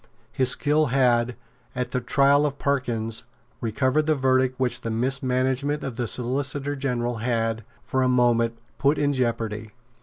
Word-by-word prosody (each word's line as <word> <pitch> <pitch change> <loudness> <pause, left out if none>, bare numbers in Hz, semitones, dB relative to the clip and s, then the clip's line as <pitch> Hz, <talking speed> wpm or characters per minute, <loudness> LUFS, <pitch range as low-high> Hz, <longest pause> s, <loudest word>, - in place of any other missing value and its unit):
His 130 -2 +1
skill 150 +3 +3
had, 125 -2 +2 0.4
at 125 0 -3
the 125 - -1
trial 140 +3 +3
of 140 -1 -5
Parkyns, 120 -5 -1 0.3
recovered 130 +6 0
the 155 - +3
verdict 130 -1 +1
which 125 -1 0
the 115 - -4
mismanagement 130 +4 0
of 130 -4 -4
the 120 -1 -2
Solicitor 135 +4 -1
General 120 -3 -2
had, 115 -1 -1 0.2
for 130 - -1
a 130 - +3
moment, 120 -2 +2 0.2
put 140 +2 +3
in 145 0 +1
jeopardy. 115 -4 -2
130 Hz, 150 wpm, -24 LUFS, 120-140 Hz, 0.4 s, skill